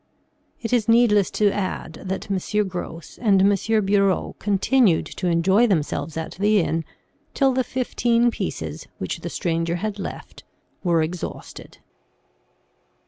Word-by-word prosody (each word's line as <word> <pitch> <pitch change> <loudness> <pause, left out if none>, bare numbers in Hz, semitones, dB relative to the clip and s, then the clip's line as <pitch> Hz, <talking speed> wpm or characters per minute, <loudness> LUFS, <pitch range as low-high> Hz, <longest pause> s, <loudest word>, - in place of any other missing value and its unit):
It 225 - -2
is 235 -2 +2
needless 225 -4 +4
to 205 -1 +4
add 185 -5 -4
that 190 +1 -4
M. 205 +2 0
Gros 175 -3 -7
and 205 -5 +4
M. 205 +2 +2
Bureau 195 -1 +1
continued 205 -1 +2
to 185 - -4
enjoy 190 +7 +3
themselves 160 -3 -1
at 160 - -4
the 210 +1 +4
inn 165 -2 -1 0.5
till 270 -2 +3
the 260 0 +1
fifteen 240 -2 +1
pieces - - -5
which - - -4
the - - -5
stranger 165 -2 -1
had 205 +3 -3
left, - - -8 0.4
were 170 -3 +2
exhausted." 170 +2 -7
200 Hz, 135 wpm, -23 LUFS, 175-220 Hz, 0.5 s, needless